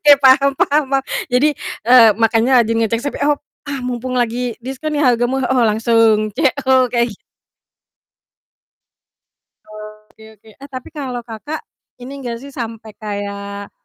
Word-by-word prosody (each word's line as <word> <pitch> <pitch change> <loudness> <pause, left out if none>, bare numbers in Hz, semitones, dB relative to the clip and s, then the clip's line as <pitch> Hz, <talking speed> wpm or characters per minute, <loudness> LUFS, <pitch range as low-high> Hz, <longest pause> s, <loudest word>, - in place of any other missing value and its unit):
Ya, 290 -1 +8
paham 275 +1 +6
paham 295 +2 +2
paham. 270 -1 +1 0.3
Jadi, 285 +5 +3 0.3
eee, 235 -1 +7
makanya 225 +2 +2
lagi 225 - -1
ngecek 225 0 0
Shopee, 285 - -4
op 295 -1 +1 0.3
"Ah, 280 -2 -4
mumpung 250 +1 -3
lagi 240 0 -1
diskon 295 +4 -4
nih, 290 - +1
harga 245 -2 +3
murah, 265 -1 -1
oh 260 - +2
langsung 220 -1 +2
CO," 260 -2 +2
kayak 235 -1 0
gi 205 - -17 2.8
Oke 220 +1 -18
oke, 220 - -20
eh, 280 - -10
tapi 255 -2 -8
kalau 260 -6 -5
Kakak, 240 +7 -7 0.4
ini 275 +3 -8
enggak 240 -3 -5
sih, 280 - -10
sampai 225 -3 -7
kayak, 200 -1 -6
245 Hz, 145 wpm, -18 LUFS, 225-270 Hz, 2.8 s, Ya